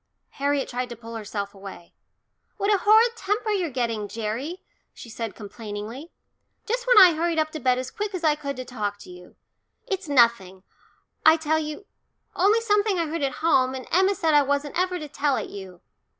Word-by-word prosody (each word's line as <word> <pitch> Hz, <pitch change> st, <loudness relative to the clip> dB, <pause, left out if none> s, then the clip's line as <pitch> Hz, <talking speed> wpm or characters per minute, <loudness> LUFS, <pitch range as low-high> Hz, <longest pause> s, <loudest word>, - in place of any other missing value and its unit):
Harriet 280 Hz, 0 st, 0 dB
tried 250 Hz, 0 st, -4 dB
to 240 Hz, -, -7 dB
pull 230 Hz, 0 st, -10 dB
herself 205 Hz, -2 st, -5 dB
away. 195 Hz, -3 st, -11 dB, 0.6 s
"What 405 Hz, +1 st, +2 dB
a 400 Hz, -, +2 dB
horrid 445 Hz, +4 st, +5 dB
temper 430 Hz, +1 st, -1 dB
you're 370 Hz, -5 st, 0 dB
getting, 230 Hz, -5 st, -2 dB
Gerry," 230 Hz, -, -5 dB, 0.3 s
she 235 Hz, -, -11 dB
said 225 Hz, -2 st, -5 dB
complainingly. 215 Hz, +7 st, -8 dB, 0.6 s
"Just 485 Hz, +2 st, -2 dB
when -, -, +5 dB
I 360 Hz, -4 st, +9 dB
hurried 330 Hz, +1 st, -1 dB
up 310 Hz, 0 st, +1 dB
to 310 Hz, -, -6 dB
bed 255 Hz, -2 st, +2 dB
as 255 Hz, 0 st, -4 dB
quick 415 Hz, -1 st, -4 dB
as 350 Hz, -, -5 dB
I 310 Hz, -2 st, +4 dB
could 280 Hz, -2 st, -5 dB
to 255 Hz, 0 st, -6 dB
talk 210 Hz, -5 st, -4 dB
to -, -, -12 dB
you. 180 Hz, 0 st, -14 dB, 0.5 s
It's 390 Hz, -7 st, -4 dB
nothing, 235 Hz, -8 st, +3 dB, 0.6 s
I 320 Hz, +1 st, +7 dB
tell 315 Hz, 0 st, 0 dB
you 305 Hz, +6 st, -6 dB, 0.5 s
only 415 Hz, +5 st, +3 dB
something 415 Hz, -3 st, +2 dB
I 335 Hz, -, 0 dB
heard 325 Hz, +1 st, -4 dB
at 275 Hz, -1 st, 0 dB
home, 260 Hz, -5 st, +3 dB
and 260 Hz, -, -7 dB
Emma 380 Hz, +3 st, +3 dB
said 325 Hz, -6 st, +1 dB
I 295 Hz, -, +6 dB
wasn't 285 Hz, +1 st, -1 dB
ever 365 Hz, 0 st, 0 dB
to 305 Hz, -3 st, -7 dB
tell 285 Hz, -1 st, 0 dB
it -, -, -4 dB
you." 190 Hz, -3 st, -10 dB
290 Hz, 195 wpm, -24 LUFS, 230-365 Hz, 0.6 s, I